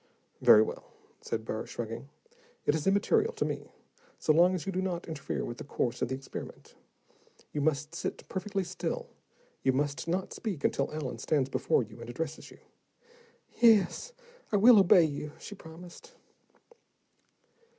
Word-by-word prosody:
"Very 110 - +8
well," - - -6 0.4
said 110 -1 -3
Burr, 110 -1 -4
shrugging. 115 +3 -6 0.6
"It - - +3
is 155 +1 -1
immaterial 425 - +3
to 440 - -1
me, - - -4 0.5
so 155 - +2
long 175 +4 +5
as 180 - -4
you 195 - -2
do 185 0 -1
not 180 -2 -3
interfere 155 -4 -3
with 120 - -6
the - - -5
course 125 -3 -2
of - - +1
the 130 - -2
experiment. 135 +1 -9 0.8
You 150 - -1
must 150 +1 0
sit 170 - -5
perfectly 195 +1 -2
still, 175 - -4 0.5
you 130 - +2
must 145 +4 -1
not 185 +3 -1
speak 195 -10 -4
until 140 - +1
Allen 155 -4 -4
stands 140 -4 +1
before - - +2
you 110 +1 -12
and 115 - -8
addresses 160 +7 -5
you." - - -15 1.0
"Yes, 225 - +4 0.4
I 210 - +3
will 225 +2 +8
obey 180 -2 +7
you," 150 -1 -3
she - - -9
promised. 180 - -12
160 Hz, 160 wpm, -30 LUFS, 135-195 Hz, 1.0 s, Very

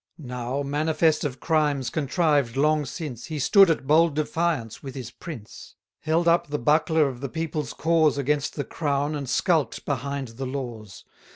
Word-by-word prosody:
Now, 125 -1 -4
manifest 155 +2 +1
of 135 -4 -3
crimes 145 -5 +1
contrived 145 -4 +1
long 150 +1 +2
since, 125 -5 -6
He 155 - -5
stood 195 +7 +6
at 160 -4 0
bold 155 +2 +4
defiance 155 -6 -1
with 135 -2 -8
his 125 -3 -6
prince; 120 - -10 0.2
Held 160 +2 +1
up 170 +1 +3
the 145 0 -2
buckler 155 +3 +3
of 130 -2 -6
the 140 - -3
people's 155 -4 -3
cause 160 -2 +2
Against 145 +1 0
the 145 - -2
crown, 145 0 -1
and 140 -4 -4
skulk'd 155 - +1
behind 140 -1 -3
the 130 +4 -6
laws. 120 - -6
145 Hz, 165 wpm, -25 LUFS, 130-160 Hz, 0.2 s, stood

